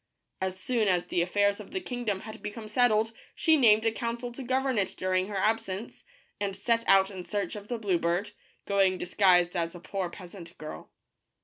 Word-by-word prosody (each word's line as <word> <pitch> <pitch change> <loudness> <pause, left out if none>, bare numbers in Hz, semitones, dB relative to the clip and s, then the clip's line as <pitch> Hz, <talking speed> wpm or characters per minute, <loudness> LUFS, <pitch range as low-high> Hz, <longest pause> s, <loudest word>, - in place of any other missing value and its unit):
As 190 0 -2
soon 230 +1 +1
as 180 -2 +2
the 175 - 0
affairs 200 +3 +2
of - - -9
the 375 - -3
kingdom 240 - -3
had 220 0 -9
become 215 +1 -6
settled 225 -1 +2 0.2
she 320 -1 +4
named 220 -6 +5
a 225 - +4
council 235 +2 -4
to 240 - -8
govern 260 -1 0
it 195 - -1
during 185 0 0
her 205 -1 -4
absence, 215 0 -1 0.4
and 200 -1 -2
set 230 +3 +1
out 195 0 +5
in 185 -2 -7
search 200 -1 -3
of 205 0 -8
the 240 - -2
blue 195 -6 0
bird, 175 +5 0 0.3
going 195 -2 +3
disguised 180 -1 +3
as 170 0 -1
a - - -8
poor 190 0 -3
peasant 175 -1 -11
girl. 155 0 -8
205 Hz, 195 wpm, -29 LUFS, 185-230 Hz, 0.4 s, named